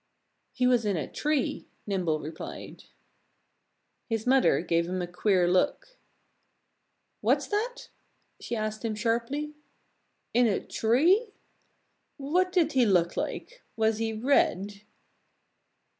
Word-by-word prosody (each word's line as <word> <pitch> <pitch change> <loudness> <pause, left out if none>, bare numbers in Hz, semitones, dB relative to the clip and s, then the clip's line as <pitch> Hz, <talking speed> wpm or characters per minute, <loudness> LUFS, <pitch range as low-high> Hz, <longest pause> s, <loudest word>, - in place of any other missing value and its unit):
"He 250 - 0
was 250 -2 +3
in 205 -4 0
a 150 - -3
tree," 300 -3 -1 0.2
Nimble 180 -6 -1
replied. 155 +1 -8 1.2
His 225 -1 -2
mother 260 -6 +4
gave 170 0 0
him 185 0 -2
a 180 - -1
queer 180 +1 +1
look. 185 - 0 1.2
"What's - - +2
that?" 475 +4 -3 0.5
she 240 - -4
asked 215 0 -3
him 225 -2 -2
sharply. 235 +7 -1 0.8
"In 245 0 +4
a 205 - +1
tree? 350 - +2 0.8
What 355 +7 0
did 340 -4 +2
he 260 -3 +3
look 180 -6 +2
like? - - -5 0.2
Was 220 -1 +1
he 225 0 -1
red?" 210 -4 +1
225 Hz, 115 wpm, -28 LUFS, 195-285 Hz, 1.2 s, mother